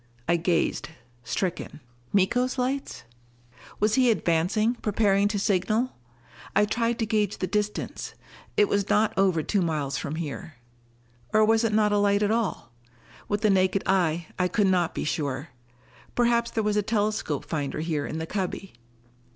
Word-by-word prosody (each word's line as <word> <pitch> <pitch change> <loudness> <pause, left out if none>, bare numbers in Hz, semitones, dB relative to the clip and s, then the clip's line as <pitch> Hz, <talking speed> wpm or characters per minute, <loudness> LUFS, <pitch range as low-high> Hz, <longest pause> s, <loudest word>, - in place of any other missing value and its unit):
I 170 - +3
gazed, 165 -3 0 0.3
stricken. 170 +3 -3 0.3
Miko's 245 +7 +2
lights? 260 +2 -2 0.8
Was 210 0 +2
he 255 +1 +4
advancing, 210 +3 +2
preparing 205 -3 +2
to 205 0 -1
signal? 205 +5 0 0.6
I 210 - +5
tried 230 +2 0
to 225 - 0
gauge 215 -1 0
the - - -1
distance; 210 +3 -3 0.4
it 205 - +5
was 200 0 0
not 210 0 +3
over 185 -5 +2
two 200 +4 +1
miles 145 -5 -1
from 140 +3 -4
here. 160 -1 -6 0.8
Or 215 0 +5
was 225 +1 +3
it 225 - +1
not 210 0 +3
a 205 - +3
light 200 0 +3
at 205 - +2
all? 215 - -1 0.6
With 205 0 -1
the 215 -2 +4
naked 190 0 +2
eye, 175 -3 +1
I 180 - +3
could 205 +3 +1
not 180 -3 +1
be - - -2
sure. 145 -1 -2 0.7
Perhaps 235 -1 +2
there 220 - -1
was 210 0 +1
a - - +4
telescope 210 -7 -1
finder 150 -1 -3
here 155 -3 -2
in 155 - -4
the 160 - -3
cubby.... 190 +1 -4
200 Hz, 160 wpm, -26 LUFS, 170-215 Hz, 0.8 s, I